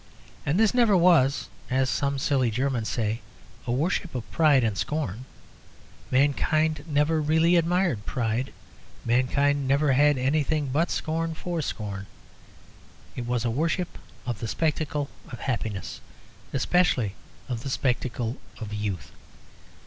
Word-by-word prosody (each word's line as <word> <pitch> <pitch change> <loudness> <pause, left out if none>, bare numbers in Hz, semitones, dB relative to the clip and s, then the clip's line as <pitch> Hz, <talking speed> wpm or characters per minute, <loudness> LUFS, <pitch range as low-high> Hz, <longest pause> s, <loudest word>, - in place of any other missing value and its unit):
And 155 +7 +2
this 220 0 +4
never 235 -6 +5
was 170 -6 +4 0.2
(as 130 +1 +2
some 140 +1 0
silly 135 -2 +2
Germans 120 -1 -1
say) 110 +3 -1 0.5
a - - 0
worship 160 +4 0
of 120 - -5
pride 150 -6 +4
and 110 -3 0
scorn; 130 -2 -3 0.8
mankind 150 +3 +2
never 155 +1 +2
really 160 +3 +3
admired 170 - +1
pride; 120 +1 -1 0.5
mankind 135 +3 +2
never 140 +2 +3
had 145 +1 +4
any 135 +5 +2
thing 145 -2 -1
but 165 +4 +2
a - - -7
scorn 165 +1 -1
for 170 0 -3
scorn. 100 -6 -4 1.1
It 120 -1 -4
was 125 -1 0
a 115 - +1
worship 165 +7 -1 0.3
of 120 -4 -3
the 115 - -3
spectacle 150 +1 -1 0.2
of 120 - -8
happiness; 110 -7 -3 0.5
especially 130 - +2 0.3
of 120 -3 -3
the 135 - -5
spectacle 125 -2 -1 0.2
of 105 -2 -6
youth. 100 - -3
140 Hz, 135 wpm, -26 LUFS, 120-155 Hz, 1.1 s, never